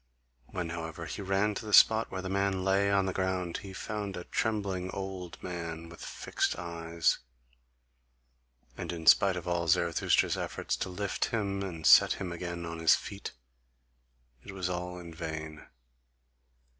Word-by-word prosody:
When, 85 Hz, -2 st, -4 dB
however, 85 Hz, 0 st, -5 dB
he 100 Hz, -, -5 dB
ran 100 Hz, +2 st, +1 dB
to 105 Hz, -, -6 dB
the 105 Hz, -, +6 dB
spot 110 Hz, 0 st, +6 dB
where 95 Hz, -1 st, -5 dB
the -, -, -3 dB
man 100 Hz, -1 st, 0 dB
lay 95 Hz, +1 st, +3 dB
on 100 Hz, -1 st, +3 dB
the 95 Hz, -, -1 dB
ground, 95 Hz, -2 st, -1 dB
he 100 Hz, -, -9 dB
found 100 Hz, 0 st, -4 dB
a 90 Hz, -, -5 dB
trembling 100 Hz, -5 st, -1 dB
old 95 Hz, -3 st, -5 dB
man, 85 Hz, -2 st, -5 dB
with 85 Hz, -, -11 dB
fixed -, -, -1 dB
eyes; 85 Hz, -1 st, 0 dB, 1.6 s
and -, -, -4 dB
in 85 Hz, -2 st, -6 dB
spite 95 Hz, +2 st, +6 dB
of 90 Hz, -1 st, -5 dB
all 85 Hz, -1 st, 0 dB
Zarathustra's 85 Hz, +1 st, +2 dB
efforts -, -, -2 dB
to -, -, -3 dB
lift 100 Hz, +2 st, -1 dB
him 100 Hz, -3 st, -1 dB
and 85 Hz, -5 st, -5 dB
set -, -, +8 dB
him 95 Hz, -3 st, -5 dB
again 85 Hz, 0 st, -5 dB
on 85 Hz, 0 st, -5 dB
his 80 Hz, -1 st, +6 dB
feet, -, -, -7 dB, 1.1 s
it 100 Hz, -, -9 dB
was 95 Hz, -2 st, -2 dB
all 90 Hz, 0 st, -4 dB
in 85 Hz, -2 st, -9 dB
vain. 80 Hz, -2 st, -6 dB
90 Hz, 160 wpm, -30 LUFS, 85-100 Hz, 1.6 s, set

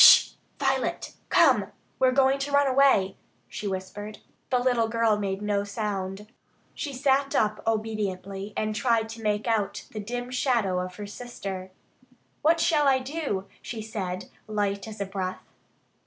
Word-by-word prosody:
"Sh! -, -, +10 dB, 0.3 s
Violet! 270 Hz, -1 st, 0 dB, 0.2 s
Come! 260 Hz, -, +5 dB, 0.3 s
We're 260 Hz, -1 st, +5 dB
going 270 Hz, +1 st, +4 dB
to 280 Hz, +1 st, -3 dB
run 285 Hz, 0 st, +5 dB
away," 260 Hz, -8 st, +4 dB, 0.3 s
she 210 Hz, -, -5 dB
whispered. 200 Hz, +2 st, -5 dB, 0.3 s
The 255 Hz, -, +3 dB
little 245 Hz, -2 st, +2 dB
girl 230 Hz, -1 st, +2 dB
made 195 Hz, 0 st, -2 dB
no 205 Hz, -1 st, +1 dB
sound. 200 Hz, -1 st, -3 dB, 0.5 s
She 290 Hz, -, -4 dB
sat 275 Hz, +1 st, +1 dB
up 215 Hz, 0 st, +2 dB
obediently 205 Hz, -3 st, -2 dB
and 215 Hz, 0 st, 0 dB
tried 225 Hz, +1 st, +1 dB
to 225 Hz, 0 st, -8 dB
make 210 Hz, -1 st, 0 dB
out 220 Hz, -4 st, 0 dB
the 220 Hz, -, -5 dB
dim 245 Hz, +4 st, -4 dB
shadow 235 Hz, -8 st, +1 dB
of 180 Hz, 0 st, -4 dB
her 205 Hz, -, -6 dB
sister. 200 Hz, -4 st, -6 dB, 0.7 s
"What 325 Hz, +2 st, +4 dB
shall 305 Hz, -3 st, +3 dB
I 270 Hz, -1 st, +5 dB
do?" 260 Hz, -7 st, -3 dB, 0.2 s
she 225 Hz, -2 st, -5 dB
said, 190 Hz, -4 st, -4 dB, 0.2 s
light 205 Hz, -1 st, -1 dB
as 220 Hz, -1 st, -8 dB
a -, -, 0 dB
breath. 190 Hz, -1 st, -4 dB
215 Hz, 155 wpm, -27 LUFS, 200-255 Hz, 0.7 s, Sh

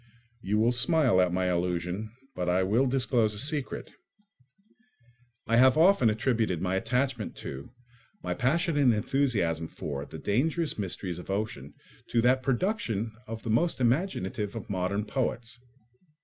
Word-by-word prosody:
You 105 Hz, +1 st, 0 dB
will 115 Hz, +3 st, +3 dB
smile 125 Hz, -, +3 dB
at 90 Hz, -1 st, +2 dB
my 90 Hz, +1 st, 0 dB
allusion, 90 Hz, +3 st, -1 dB, 0.3 s
but 90 Hz, -1 st, -2 dB
I 90 Hz, +1 st, +2 dB
will 115 Hz, +8 st, +2 dB
disclose 125 Hz, -4 st, +1 dB
a -, -, -6 dB
secret. 140 Hz, +4 st, -2 dB, 1.5 s
I 115 Hz, -, +2 dB
have 130 Hz, +3 st, +6 dB
often 165 Hz, -, +5 dB
attributed 110 Hz, -4 st, 0 dB
my 90 Hz, +1 st, -1 dB
attachment 125 Hz, +2 st, -1 dB
to, 70 Hz, +1 st, -7 dB, 0.5 s
my -, -, -1 dB
passionate 145 Hz, -2 st, +2 dB
enthusiasm 105 Hz, -, 0 dB
for, 70 Hz, -3 st, -5 dB
the -, -, -9 dB
dangerous 150 Hz, -, 0 dB
mysteries 90 Hz, -2 st, -4 dB
of 90 Hz, -, -11 dB
ocean 100 Hz, -9 st, -4 dB, 0.3 s
to 120 Hz, -, +1 dB
that 130 Hz, +2 st, +3 dB
production 125 Hz, -, -1 dB, 0.2 s
of 115 Hz, 0 st, -6 dB
the 115 Hz, -, -2 dB
most 165 Hz, +9 st, +1 dB
imaginative 120 Hz, -, 0 dB
of 115 Hz, -1 st, -6 dB
modern 95 Hz, +2 st, -1 dB
poets. 120 Hz, 0 st, -3 dB
115 Hz, 140 wpm, -28 LUFS, 95-130 Hz, 1.5 s, have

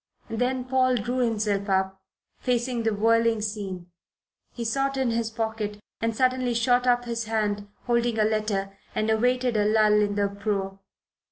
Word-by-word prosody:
Then 250 Hz, +3 st, 0 dB
Paul 255 Hz, 0 st, +2 dB
drew 245 Hz, +3 st, -1 dB
himself 210 Hz, -4 st, 0 dB
up, 190 Hz, 0 st, 0 dB, 0.4 s
facing 245 Hz, -1 st, 0 dB
the 225 Hz, -1 st, +1 dB
whirling 230 Hz, +1 st, +3 dB
scene. 195 Hz, -4 st, -4 dB, 0.6 s
He 235 Hz, -, -5 dB
sought 275 Hz, +4 st, 0 dB
in 260 Hz, -3 st, +1 dB
his 230 Hz, -1 st, -1 dB
pockets 220 Hz, -2 st, -3 dB, 0.2 s
and 225 Hz, 0 st, 0 dB
suddenly 255 Hz, -1 st, +1 dB
shot 245 Hz, +2 st, +2 dB
up 245 Hz, 0 st, +3 dB
his 230 Hz, -1 st, -3 dB
hand, 210 Hz, -2 st, -1 dB, 0.2 s
holding 235 Hz, -1 st, +1 dB
a 215 Hz, -, +4 dB
letter, 210 Hz, -2 st, -1 dB, 0.2 s
and 215 Hz, +1 st, +1 dB
awaited 250 Hz, +2 st, +1 dB
a 210 Hz, -1 st, +2 dB
lull 215 Hz, 0 st, +4 dB
in 205 Hz, -1 st, 0 dB
the 205 Hz, 0 st, +2 dB
uproar. 200 Hz, -1 st, -3 dB
225 Hz, 160 wpm, -26 LUFS, 210-245 Hz, 0.6 s, a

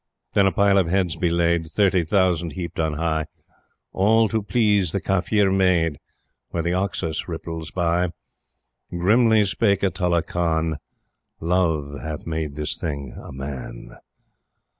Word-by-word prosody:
Then 100 Hz, -1 st, +4 dB
a -, -, +2 dB
pile 100 Hz, 0 st, +4 dB
of 90 Hz, -, +1 dB
heads 90 Hz, -2 st, 0 dB
be 90 Hz, -, 0 dB
laid 85 Hz, -1 st, +1 dB
Thirty 95 Hz, +1 st, +2 dB
thousand 85 Hz, -2 st, +1 dB
heaped 85 Hz, 0 st, -6 dB
on 80 Hz, -1 st, 0 dB
high 80 Hz, 0 st, -1 dB, 0.7 s
All 110 Hz, +4 st, +4 dB
to 110 Hz, -1 st, 0 dB
please 105 Hz, -5 st, +1 dB
the 100 Hz, -, 0 dB
Kafir 95 Hz, +1 st, +1 dB
maid, 90 Hz, -5 st, +2 dB, 0.5 s
Where 85 Hz, -, -2 dB
the 85 Hz, +1 st, 0 dB
Oxus 90 Hz, -3 st, -2 dB
ripples 80 Hz, -1 st, -5 dB
by. 85 Hz, +2 st, 0 dB, 0.8 s
Grimly 110 Hz, +5 st, +3 dB
spake 100 Hz, 0 st, +1 dB
Atulla 90 Hz, -3 st, +1 dB
Khan: 80 Hz, -2 st, -1 dB, 0.6 s
"Love 80 Hz, -5 st, 0 dB
hath 80 Hz, -2 st, -6 dB
made 80 Hz, -3 st, -3 dB
this 75 Hz, +1 st, -2 dB
thing 70 Hz, -5 st, -4 dB
a -, -, -10 dB
Man." 65 Hz, -3 st, -7 dB
85 Hz, 140 wpm, -23 LUFS, 80-95 Hz, 0.8 s, Then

